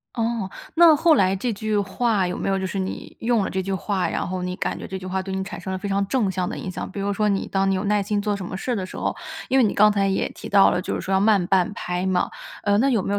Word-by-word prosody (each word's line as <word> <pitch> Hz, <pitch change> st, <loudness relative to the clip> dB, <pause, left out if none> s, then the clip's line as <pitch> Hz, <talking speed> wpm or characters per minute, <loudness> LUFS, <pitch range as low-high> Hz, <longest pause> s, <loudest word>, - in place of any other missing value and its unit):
哦。 230 Hz, -3 st, -1 dB, 0.3 s
那 335 Hz, -1 st, +7 dB
后 325 Hz, +1 st, +5 dB
来 190 Hz, -6 st, +3 dB
这 235 Hz, +5 st, -2 dB
句 215 Hz, 0 st, -2 dB
话 200 Hz, 0 st, +1 dB
有 180 Hz, -, -3 dB
没 -, -, -3 dB
有 195 Hz, 0 st, +1 dB
就 190 Hz, -, -2 dB
是， 195 Hz, -, -4 dB
你 190 Hz, 0 st, -5 dB
用 230 Hz, -2 st, +2 dB
了 -, -, -3 dB
这 190 Hz, -, -1 dB
句 195 Hz, +1 st, -3 dB
话， 190 Hz, 0 st, -1 dB
然 -, -, -2 dB
后 185 Hz, 0 st, -3 dB
你 180 Hz, 0 st, -3 dB
感 -, -, -2 dB
觉 -, -, -7 dB
这 190 Hz, -, -5 dB
句 185 Hz, -, -9 dB
话 190 Hz, +1 st, -2 dB
对 190 Hz, 0 st, -5 dB
你 190 Hz, -, -1 dB
产 190 Hz, -, -7 dB
生 190 Hz, -, -5 dB
了 190 Hz, -, -2 dB
非 200 Hz, +2 st, -5 dB
常 200 Hz, 0 st, 0 dB
正 220 Hz, -4 st, +1 dB
向 180 Hz, -1 st, -2 dB
的 -, -, -5 dB
影 185 Hz, -, -5 dB
响。 185 Hz, -, -5 dB
比 200 Hz, -, -6 dB
如 200 Hz, +1 st, 0 dB
说 210 Hz, +1 st, +1 dB
你 195 Hz, -1 st, 0 dB
当 195 Hz, 0 st, +1 dB
你 -, -, +2 dB
有 185 Hz, -, -2 dB
耐 205 Hz, 0 st, +2 dB
心 205 Hz, +1 st, -1 dB
做 205 Hz, -1 st, 0 dB
什 195 Hz, -, -6 dB
么 185 Hz, -, -5 dB
事 245 Hz, +6 st, -2 dB
的 190 Hz, -, -2 dB
时 -, -, -10 dB
候， -, -, -1 dB, 0.3 s
因 265 Hz, -, +3 dB
为 255 Hz, -, +6 dB
你 210 Hz, -, +1 dB
刚 210 Hz, +1 st, +6 dB
才 200 Hz, -1 st, +1 dB
也 190 Hz, -, 0 dB
提 -, -, -9 dB
到 200 Hz, -1 st, +6 dB
了， 180 Hz, -, 0 dB
就 -, -, -3 dB
是 -, -, -2 dB
说 190 Hz, -, -4 dB
要 190 Hz, -, +3 dB
慢 205 Hz, -3 st, +4 dB
半 185 Hz, +1 st, +2 dB
拍 180 Hz, 0 st, -3 dB
嘛。 185 Hz, -1 st, +1 dB, 0.3 s
呃， 205 Hz, 0 st, +2 dB
那 265 Hz, +5 st, +3 dB
有 230 Hz, -7 st, +2 dB
没 200 Hz, -, -2 dB
有 205 Hz, -, +1 dB
195 Hz, 345 characters per minute, -23 LUFS, 190-210 Hz, 0.3 s, 那